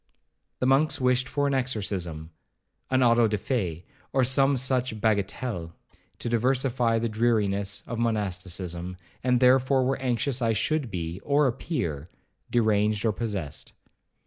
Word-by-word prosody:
The - - -1
monks 135 +4 +3
wished 125 0 +2
for 145 0 0
an 140 - +1
exorcism, 95 -11 -2 0.6
an 130 0 +3
auto 115 -1 +5
de 105 0 -1
fe, 90 - -2 0.3
or 130 - +2
some 135 +2 +3
such 125 -3 0
bagatelle, 100 -4 -1 0.4
to - - -6
diversify 120 0 +1
the 115 +1 0
dreariness 105 -3 0
of 115 -1 -5
monasticism, 90 -5 -3 0.3
and 125 -1 +3
therefore 130 +1 +4
were 130 +1 -1
anxious 125 +1 0
I 115 -1 +2
should 145 +4 0
be, 85 -2 -4
or 145 +4 +2
appear, 115 - -2 0.4
deranged 105 -2 +2
or 110 - +3
possessed. 100 -9 -5
115 Hz, 135 wpm, -26 LUFS, 100-130 Hz, 0.6 s, auto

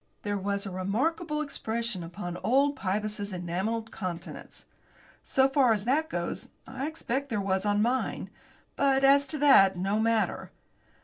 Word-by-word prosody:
There 205 -1 -1
was 200 0 -2
a 195 - -5
remarkable 300 - -1
expression 235 -8 -3
upon 175 +1 -6
old 275 +9 +2
Pybus's 205 +1 -2
enamelled 190 +6 -3
countenance. 175 -3 -7 0.6
So 265 0 +3
far 270 -4 +4
as 205 -1 -2
that 300 +6 +1
goes, 170 -1 -4 0.2
I 265 +2 -4
expect 280 -3 -3
there 225 -4 -1
was 195 0 0
on 205 0 +2
mine 255 +3 -1 0.4
but, 275 -1 +2
as 280 +1 +5
to 305 - -4
that, 195 -10 +6
no 195 +4 0
matter. 225 0 0
220 Hz, 145 wpm, -28 LUFS, 195-270 Hz, 0.6 s, that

